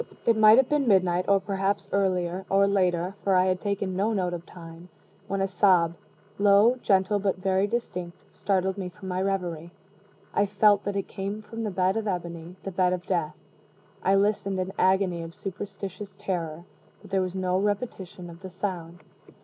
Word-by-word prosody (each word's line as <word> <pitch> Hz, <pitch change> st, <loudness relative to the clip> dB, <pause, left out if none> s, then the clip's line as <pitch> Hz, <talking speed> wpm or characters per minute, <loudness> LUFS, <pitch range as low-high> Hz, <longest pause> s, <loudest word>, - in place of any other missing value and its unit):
It 230 Hz, -, +4 dB
might 215 Hz, +1 st, +7 dB
have 265 Hz, -1 st, +5 dB
been 295 Hz, -3 st, +1 dB
midnight, 185 Hz, -3 st, +3 dB
or 200 Hz, 0 st, +4 dB
perhaps 195 Hz, 0 st, -1 dB
earlier, 185 Hz, -2 st, 0 dB
or 195 Hz, 0 st, +4 dB
later, 185 Hz, -2 st, +1 dB
for 195 Hz, -1 st, +2 dB
I 185 Hz, 0 st, +4 dB
had 185 Hz, -1 st, 0 dB
taken 200 Hz, -2 st, -2 dB
no 210 Hz, +4 st, +1 dB
note 180 Hz, -3 st, -1 dB
of 175 Hz, 0 st, -6 dB
time, 170 Hz, 0 st, -12 dB, 0.4 s
when 195 Hz, -1 st, -1 dB
a 195 Hz, -, +1 dB
sob, 180 Hz, -3 st, +3 dB, 0.5 s
low, 205 Hz, +5 st, +5 dB
gentle, 195 Hz, +1 st, +2 dB
but 195 Hz, -2 st, 0 dB
very 190 Hz, +1 st, +1 dB
distinct, 180 Hz, -7 st, -4 dB, 0.2 s
startled 190 Hz, 0 st, 0 dB
me 185 Hz, -2 st, -4 dB
from 190 Hz, +1 st, -10 dB
my 180 Hz, 0 st, -1 dB
revery. 180 Hz, -4 st, -2 dB, 0.6 s
I 205 Hz, -, +2 dB
felt 205 Hz, 0 st, +3 dB
that 200 Hz, 0 st, -2 dB
it 195 Hz, -, -2 dB
came 200 Hz, +2 st, -5 dB
from 225 Hz, +2 st, -6 dB
the 215 Hz, -, -1 dB
bed 185 Hz, +1 st, +1 dB
of 220 Hz, -1 st, -2 dB
ebony 175 Hz, -2 st, -4 dB
the 195 Hz, -, -4 dB
bed 180 Hz, 0 st, +2 dB
of 180 Hz, 0 st, -4 dB
death. 170 Hz, -5 st, -1 dB, 0.7 s
I 195 Hz, -, +3 dB
listened 195 Hz, -1 st, +1 dB
in 185 Hz, 0 st, -2 dB
an -, -, -9 dB
agony 185 Hz, -2 st, +2 dB
of 165 Hz, 0 st, -8 dB
superstitious 195 Hz, 0 st, -7 dB
terror 170 Hz, -5 st, -3 dB, 0.4 s
but -, -, -14 dB
there 195 Hz, -1 st, +2 dB
was 185 Hz, 0 st, -3 dB
no 185 Hz, 0 st, 0 dB
repetition 200 Hz, -3 st, -3 dB
of 170 Hz, 0 st, -11 dB
the 190 Hz, -, -7 dB
sound. 175 Hz, -2 st, -5 dB
190 Hz, 190 wpm, -26 LUFS, 180-200 Hz, 0.7 s, might